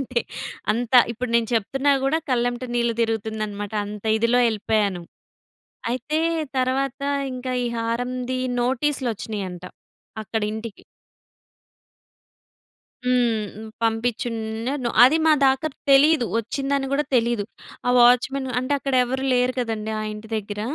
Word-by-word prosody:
అంటే, 250 -2 -1 0.5
అంత 235 +2 -3 0.2
ఇప్పుడు 245 +1 -4
నేను 230 -2 0
చెప్తున్నా 270 +6 +1
గూడా, 310 +4 +2
కళ్ళమ్మట 245 0 0
నీళ్లు 235 -1 +1
తిరుగుతుందన్నమాట. 215 -2 -3
అంత 210 +1 -8
ఇదిలో 230 +2 +3
ఎళ్ళిపోయాను. 205 -4 0 0.9
అయితే, 280 +6 -1 0.4
తరువాత 265 +1 0 0.3
ఇంకా 255 0 -4
ఈ - - -1
హారంది 245 +2 -2 0.2
నోటీస్‌లు 265 +1 0
వచ్చినయంట 190 -4 -6 0.6
అక్కడ 220 +1 -3
ఇంటికి 220 -1 -7 2.2
హ్మ్, 225 -4 0 0.2
పంపించున్నాను. 230 +2 -1 0.2
అది 270 +5 +5
మా 315 - +6
దాకా 270 +4 +2 0.2
తెలీదు, 275 -1 +5
వచ్చిందని 275 +4 -1
గూడా 290 +2 +1
తెలీదు. 235 -3 +1 0.4
ఆ - - +3
వాచ్‌మెన్ 250 +2 +4
అంటే, 255 +3 -2
అక్కడ 275 -1 -2
ఎవరు 260 +2 -3
లేరు 250 0 +2
కదండీ 220 -3 -2
ఆ - - -3
ఇంటి 210 +1 -10
దగ్గర. 210 -1 -5
240 Hz, 115 wpm, -23 LUFS, 220-260 Hz, 2.2 s, మా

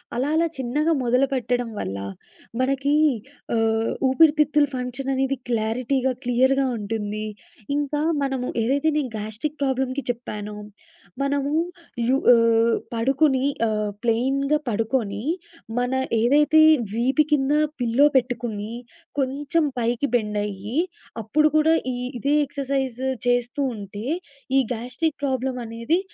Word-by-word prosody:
అలా 260 +4 0
అలా 335 +1 +3
చిన్నగా 290 +6 +1
మొదలుపెట్టడం 250 -1 +1
వల్ల 95 - -3 0.6
మనకి 275 +2 +1 1.2
ఊపిరితిత్తులు 300 0 +4
ఫంక్షననేది 265 +1 -1
క్లారిటీగా, 250 +4 0
క్లియర్‌గా 260 +2 +3
ఉంటుంది. 210 0 -3 0.5
ఇంకా 290 0 -1 0.2
మనము 265 -2 -2 0.2
ఏదైతే 280 +6 +2
నేను 265 -6 -1
గ్యాస్ట్రిక్ 220 +8 -4
ప్రాబ్లమ్‌కి 265 0 -1
చెప్పానో 210 -3 -4 0.7
మనము 280 +1 0 0.5
రు 260 +2 +3 0.2
ఆహ్, 230 0 +4 0.2
పడుకొని 270 +3 +2 0.6
ప్లెయిన్‌గా 270 +6 +1
పడుకొని, 220 -1 -1 0.6
మన 245 0 0 0.3
ఏదైతే 295 +6 +5 0.3
వీపు 255 +6 +3
కింద 275 0 +2 0.3
పిల్లో 245 +3 +3
పెట్టుకుని 230 -4 -2 0.5
కొంచెం 280 +4 0 0.2
పైకి 240 +4 0
బెండయ్యి, 210 -1 -2 0.5
అప్పుడు 300 +8 +3
కూడా 310 +1 +5 0.2
ఈ - - -4 0.2
ఇదే 280 +4 +1
ఎక్సర్సైజ్ 270 -3 -2 0.3
చేస్తూ 245 +3 +1
ఉంటే, 205 +1 -7 0.5
ఈ - - +7
గ్యాస్ట్రిక్ 250 +7 -3
ప్రాబ్లమనేది 255 +2 -1
255 Hz, 100 wpm, -23 LUFS, 230-280 Hz, 1.2 s, ఈ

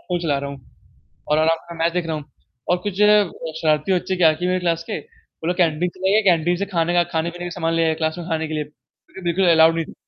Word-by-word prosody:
Phone 175 -1 -1
चला 150 -5 0
रहा 140 0 -5
हूँ। 135 -3 -13 0.5
और 150 - +2
आराम 165 +1 +3
से 170 - -7
मैच 170 0 +1
देख 180 -1 -1
रहा 160 - -2
हूँ। 150 -2 -7 0.4
और 180 - +3
कुछ 205 - -2
जो 210 - +6
है 210 0 +6 0.4
शरारती 155 +3 +2
बच्चे 185 +1 -1
क्या 170 -3 +5
किए 175 +3 -3
मेरे 185 0 +1
क्लास 165 -2 -1
के, - - -2
वो 455 - -13
लोग 180 - 0
कैंटीन 175 0 +1
चले 190 +1 0
गए 220 - +5
कैंटीन 175 0 +2
से 200 - -2
खाने 175 -3 -1
का 175 0 +4
खाने-पीने 170 +2 -2
के 175 - -5
सामान 165 -1 -2
ले 165 0 +2
आए 160 - +2
क्लास 160 0 -2
में 175 - -6
खाने 160 -2 -1
के 155 - -6
लिए। 155 - -1
तो 150 +1 -26
ये - - -7
बिल्कुल 175 +2 +1
अलाउड 165 0 +5
ही 165 - 0
नहीं। - - -12
170 Hz, 280 wpm, -21 LUFS, 160-180 Hz, 0.5 s, जो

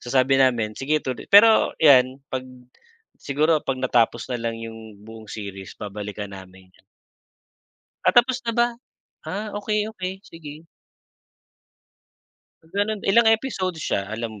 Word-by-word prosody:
So, - - -10
sabi 135 +1 +3
namin, 120 -5 +2
sige 145 +3 +1
tulo 130 - -4
pero, 220 +2 +6
'yan 135 -2 +4
'pag 130 - -1 0.8
siguro 155 +3 +1
'pag 135 - -3
natapos 120 -1 +1
na 120 - -3
lang 115 0 -3
'yong 110 -2 -10
buong 110 -1 -12
series 100 -3 -8
babalikan 105 -1 -7
namin 95 -1 -13
ya - - -26 1.2
Ah, - - +4
tapos 245 +1 +4
na 230 - -1
ba? 235 +1 +3 0.6
Ah, 210 +3 -4
okay, 210 +1 -1
okay. 190 -3 -6
Sige. 155 -2 -12 2.0
Ah, 160 - -23
gano'n. 205 +1 -1
Ilang 220 +3 +5
episodes 215 -7 -1
siya, 100 0 -2
alam 110 +1 -5
130 Hz, 135 wpm, -23 LUFS, -, 2.0 s, pero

